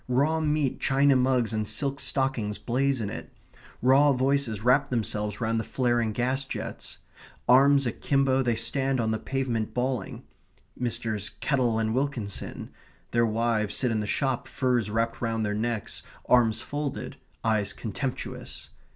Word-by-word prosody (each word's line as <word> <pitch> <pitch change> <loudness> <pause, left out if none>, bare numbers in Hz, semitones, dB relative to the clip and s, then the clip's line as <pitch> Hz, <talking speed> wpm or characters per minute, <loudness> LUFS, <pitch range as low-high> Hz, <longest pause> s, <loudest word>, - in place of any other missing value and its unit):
Raw 140 +6 +2
meat, 150 -3 0
china 140 0 +3
mugs, 125 -3 +2
and 110 -1 -1
silk 140 +2 0
stockings 130 -7 0
blaze 130 +5 0
in 105 -3 -3
it. - - -8 0.5
Raw 140 +3 +6
voices 130 -4 0
wrap 135 +3 +4
themselves 105 -3 -2
round 115 -1 0
the - - -2
flaring 120 -3 0
gas 130 +5 0
jets. 135 - -6 0.5
Arms 140 +2 +6
akimbo, 135 +2 +1
they 120 -3 +1
stand 135 +2 0
on 110 -1 +1
the 110 - -1
pavement 120 -3 -2
bawling 125 -4 -2 0.5
Messrs. 115 -4 -2
Kettle 125 -5 0
and 110 0 0
Wilkinson; 125 -7 -3 0.4
their 115 0 +3
wives 110 -2 0
sit 125 -3 +1
in 110 - 0
the 105 - -3
shop, 135 +1 -1
furs 125 -5 0
wrapped 115 +2 -1
round 115 -2 -1
their 105 - -1
necks, 110 0 -3 0.3
arms 115 -3 +4
folded, 145 +1 -4 0.3
eyes 110 -3 +1
contemptuous. 125 +4 -5
125 Hz, 145 wpm, -27 LUFS, 110-135 Hz, 0.5 s, Raw